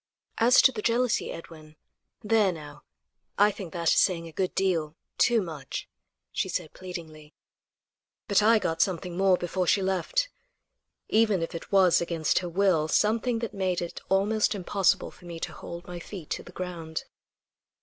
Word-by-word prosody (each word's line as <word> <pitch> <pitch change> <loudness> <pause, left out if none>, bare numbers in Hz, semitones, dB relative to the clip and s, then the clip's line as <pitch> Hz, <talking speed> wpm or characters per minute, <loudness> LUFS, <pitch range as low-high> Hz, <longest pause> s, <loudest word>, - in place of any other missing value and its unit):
"As 240 +3 +6
to 265 - +7
the 215 - -5
jealousy, 235 +1 +1
Edwin. 155 -2 -11 0.5
There, 215 -3 +3
now; 150 -3 -10 0.6
I 205 +1 +5
think 190 -4 -8
that 170 -1 0
is - - +4
saying 170 -3 +2
a - - -10
good 185 +3 -2
deal. 165 -5 0 0.2
Too 235 -4 +4
much," 155 -6 -6 0.4
she - - -2
said - - -3
pleadingly; 160 -5 -9 0.9
but 200 -1 +4
I 225 +2 +5
got 165 -5 -1
something 180 -1 -1
more 190 0 +4
before 175 +1 -2
she 195 - +3
left, - - 0 0.8
even 215 -5 +3
if 165 - -5
it 165 - -8
was 190 -4 +5
against 165 -2 +1
her 180 - -5
will; 175 -3 +2
something 230 +7 +2
that - - -9
made 185 -2 -1
it 175 -1 -6
almost 210 +3 +2
impossible 195 0 +1
for 180 - -18
me 170 -1 -7
to - - -5
hold 170 0 -8
my 175 -1 -7
feet 175 -2 -9
to - - -2
the - - -13
ground. 170 -3 -5
185 Hz, 170 wpm, -27 LUFS, 165-205 Hz, 0.9 s, to